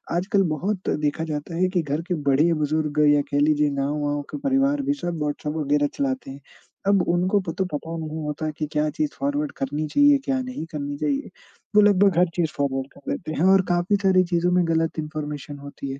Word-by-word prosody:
आजकल 195 +3 +2
बहुत 185 +6 -2
देखा 150 +1 -1
जाता 150 +3 -4
है 185 +1 +3
कि 180 - +2
घर 150 0 -2
के 185 - 0 0.2
बड़े 150 +5 +4
बुज़ुर्ग 150 -1 -1
या 145 - +3
कह 145 - +2
लीजिए 150 0 +3
गाँव-वाँव 145 +1 -1
के - - -4
परिवार 275 +1 +2
भी 280 +1 0
सब 175 - -4
व्हाट्सऐप 150 0 -2
वगैरह 145 -1 +1
चलाते 265 - -2
हैं, 135 - -10 0.5
अब 200 -1 +4
उनको 180 +4 +2
पो 180 -3 -4
तो 185 +3 -2
पता 165 +3 -4
नहीं 155 +1 -5
होता 150 +1 -3
कि 155 - -2
क्या 150 0 +1
चीज़ 300 - -2
फॉरवर्ड 285 +1 -1
करनी 145 +3 -2
चाहिए, 285 - +5
क्या 270 -1 0
नहीं 255 -9 -5
करनी 145 -2 -4
चाहिए? 280 - -1 0.5
वो 210 - +8
लगभग 200 -3 +4
हर 180 - +5
चीज़ 165 -3 0
फॉरवर्ड 135 -2 -1
कर 140 - -7
देते 155 -3 -4
हैं - - +4
और 195 - +6
काफ़ी 175 +3 +2
सारी 185 -1 +5
चीज़ों 175 +1 +2
में 180 -1 +3
गलत 165 -1 0
इन्फ़ॉर्मेशन 150 -2 -5
होती 140 -1 -7
है। 135 - -7
160 Hz, 210 wpm, -24 LUFS, 150-195 Hz, 0.5 s, वो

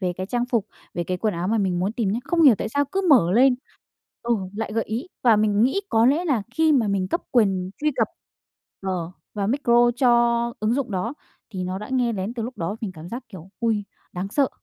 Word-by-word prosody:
về 180 -2 -1
cái 185 +1 -5
trang 240 +3 -1
phục, 235 -5 0 0.3
về 175 -1 -2
cái 185 - -2
quần 210 +2 -1
áo 175 +2 -2
mà 225 +1 +1
mình 185 -3 0
muốn 190 +4 -1
tìm 230 -4 -1
nhá, 225 - -1
không 340 -1 +1
hiểu 270 -7 +8
tại - - -2
sao 285 +6 +1
cứ 380 +8 -2
mở 205 - +5
lên 255 +4 +5 0.7
ừ, 235 0 +1 0.2
lại 220 -1 -3
gợi 225 0 0
ý. 230 +8 -4 0.2
Và 230 -4 +5
mình 210 0 +2
nghĩ 270 +11 +2
có 225 -4 +4
lẽ 300 +7 +3
là 270 - +1
khi 320 -1 +3
mà 235 -7 +3
mình 190 -2 0
cấp 340 - -1
quyền 190 -6 +2
truy 305 0 +2
cập, - - +2 0.7
ờ, 185 -3 -3 0.2
vào 200 -2 -1
micro 240 -2 +3
cho 255 -1 +3 0.5
ứng 215 +2 +1
dụng 265 -3 -2
đó 200 +7 -2 0.4
thì 185 -3 -4
nó 185 +1 -3
đã 210 - -8
nghe 250 -3 +1
lén 200 +2 -4
từ 235 - -3
lúc 245 +3 -6
đó, 170 +5 -2
mình 210 -5 -4
cảm 160 0 -10
giác, 240 +5 -6
kiểu, 185 -5 -11
ôi 220 -3 0 0.3
đáng 180 +2 -4
sợ! 275 +5 +2
220 Hz, 240 wpm, -23 LUFS, 190-250 Hz, 0.7 s, hiểu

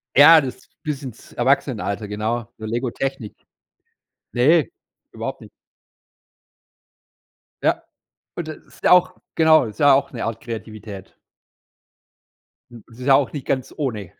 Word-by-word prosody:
Ja, 155 +3 +9
das 130 -3 -7 0.2
bis 145 -3 -4
ins 125 -4 -10
Erwachsenenalter. 120 -5 0
Genau, 110 +3 -3
so 110 - -8
Lego 120 +3 -2
Technik. 135 -6 -4 1.0
Ne, 155 +7 +4 0.4
überhaupt - - -5
nicht. - - -13 2.1
Ja, - - +1 0.5
und 170 -2 -5
das 155 - -6
ist - - -21
ja - - +4
auch 180 0 +5 0.2
genau, 160 -4 +5
ist 105 -2 -9
ja 145 -1 +6
auch 140 +1 +1
'ne 120 - -5
Art 115 0 -4
Kreativität. 110 -4 -8 1.5
Hm, 115 -3 -13
es 115 - -15
ist 125 - -7
ja 135 - +7
auch 140 - +1
nicht 145 - -6
ganz 130 -1 -2
ohne. 110 - -4
125 Hz, 140 wpm, -21 LUFS, 110-145 Hz, 2.1 s, Ja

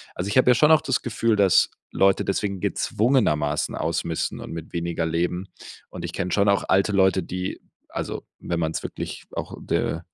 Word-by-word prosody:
Also, 90 +3 -3
ich 105 - 0
habe 125 - +5
ja 125 - +6
schon 150 +6 +5
auch 155 -1 +6
das - - 0
Gefühl, 115 -1 0
dass 100 -4 +4 0.2
Leute 95 0 +3
deswegen 100 -1 -2
gezwungenermaßen 75 - +1
ausmisten 80 0 -2
und - - -7
mit 80 -1 -7
weniger 85 -1 -2
leben 90 +3 -1 0.4
und - - -7
ich - - -6
kenne 90 - -2
schon 100 +2 +2
auch 100 0 +3
alte 95 +2 +3
Leute, 95 -1 +4
die 90 +2 -4 0.3
also, - - -5
wenn 85 -1 -3
man's 80 0 -1
wirklich - - -6
auch - - -5
de 80 - -1
95 Hz, 185 wpm, -24 LUFS, 85-105 Hz, 0.4 s, ja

